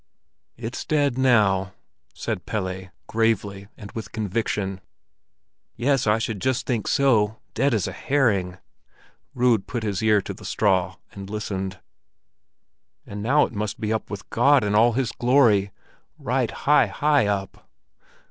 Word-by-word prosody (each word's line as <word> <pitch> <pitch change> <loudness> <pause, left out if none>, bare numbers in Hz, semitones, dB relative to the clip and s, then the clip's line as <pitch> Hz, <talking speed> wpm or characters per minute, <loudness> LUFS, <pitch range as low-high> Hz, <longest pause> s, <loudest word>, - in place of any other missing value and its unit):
"It's 115 +1 -5
dead 145 -4 +1
now!" 105 -7 +2 0.4
said - - -4
Pelle, 95 -3 -3 0.2
gravely 100 -3 -1
and 100 -3 -10
with 110 - -7
conviction. 105 -3 -2 0.9
"Yes, 135 0 +1
I 105 +1 +4
should 110 -3 -3
just 130 0 0
think 115 -5 -2
so—dead 120 +1 +1
as 110 -5 +1
a - - -4
herring." 100 -10 0 0.8
Rud 125 0 +3
had 110 -4 0
put 120 -3 -4
his 100 -2 -2
ear 110 -1 +4
to - - -6
the - - -14
straw 95 -3 +1 0.2
and 100 0 -9
listened. 95 -3 -4 1.3
"And 100 0 -7
now 140 +7 +3
it - - -9
must 105 -1 -3
be 110 0 -1
up 110 - -3
with 100 -1 -7
God 135 +2 +4
in 105 0 0
all 115 +3 +4
His 125 -1 -1
glory—right 120 -6 0
high, - - +3
high 145 -6 +2
up." 100 -1 -4
110 Hz, 140 wpm, -24 LUFS, 100-120 Hz, 1.3 s, I